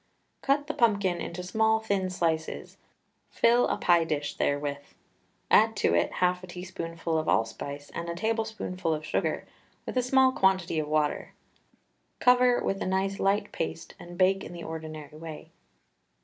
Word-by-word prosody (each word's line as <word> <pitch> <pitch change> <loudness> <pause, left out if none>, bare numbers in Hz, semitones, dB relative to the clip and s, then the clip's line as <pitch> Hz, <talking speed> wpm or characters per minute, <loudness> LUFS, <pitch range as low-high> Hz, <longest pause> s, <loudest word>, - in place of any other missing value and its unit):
Cut 280 +1 +1
the 305 - -3
pumpkin 200 -7 +2
into 180 +1 -5
small, 220 +4 +2
thin 200 -4 -1
slices, 165 -3 -2 0.5
fill 240 +1 +3
a - - -1
pie 175 -2 +4
dish 150 -2 -2
therewith, 145 0 -1 0.7
add - - +5
to - - +2
it 85 - +2
half 180 0 +1
a - - -8
teaspoonful 170 -2 -4
of 155 - -4
allspice 140 +6 -2
and 170 0 -4
a 170 - -3
tablespoonful 220 -5 -2
of 155 0 -7
sugar, 155 - -1 0.4
with - - -5
a 255 - +3
small 260 +1 +4
quantity 190 -7 +2
of 150 - -2
water. 150 -1 -1 0.8
Cover 250 0 +4
with 195 - -1
a - - -1
nice 190 +1 0
light 200 +1 +1
paste 165 0 -4
and 175 0 -10
bake 190 +1 +3
in - - -8
the 170 -1 -8
ordinary 155 -2 -7
way. 160 -2 -9
180 Hz, 160 wpm, -28 LUFS, 160-205 Hz, 0.8 s, add